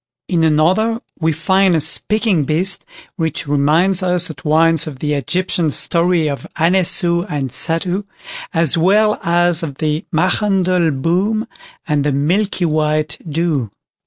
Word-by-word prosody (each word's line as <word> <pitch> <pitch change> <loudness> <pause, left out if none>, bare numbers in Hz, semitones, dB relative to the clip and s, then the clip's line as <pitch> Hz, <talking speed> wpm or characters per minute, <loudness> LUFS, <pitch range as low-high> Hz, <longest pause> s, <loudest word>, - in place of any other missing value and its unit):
In 170 -3 0
another 180 +9 +2 0.2
we 160 -1 +1
find 185 +4 +2
a - - +2
"speaking 210 +1 +1
beast", 175 +7 -1 0.3
which 160 -4 -2
reminds 155 +7 +2
us 180 -2 0
at 140 -3 -14
once 160 +1 +2
of 145 -4 -7
the 150 +2 -2
Egyptian 175 +3 0
story 170 +2 +1
of 140 -2 -5
Anessou 170 0 +3
and 135 -4 -3
Satou, 175 - -1 0.5
as 165 -5 +2
well 210 +6 +2
as 175 0 +1
of 150 -5 -5
the 155 +4 -2
"Machandelboom", 185 - 0 0.4
and 150 -2 0
"the 145 - 0
Milk 175 +10 0
white 155 -2 0
Doo". 150 -6 -1
165 Hz, 130 wpm, -17 LUFS, 150-185 Hz, 0.5 s, Anessou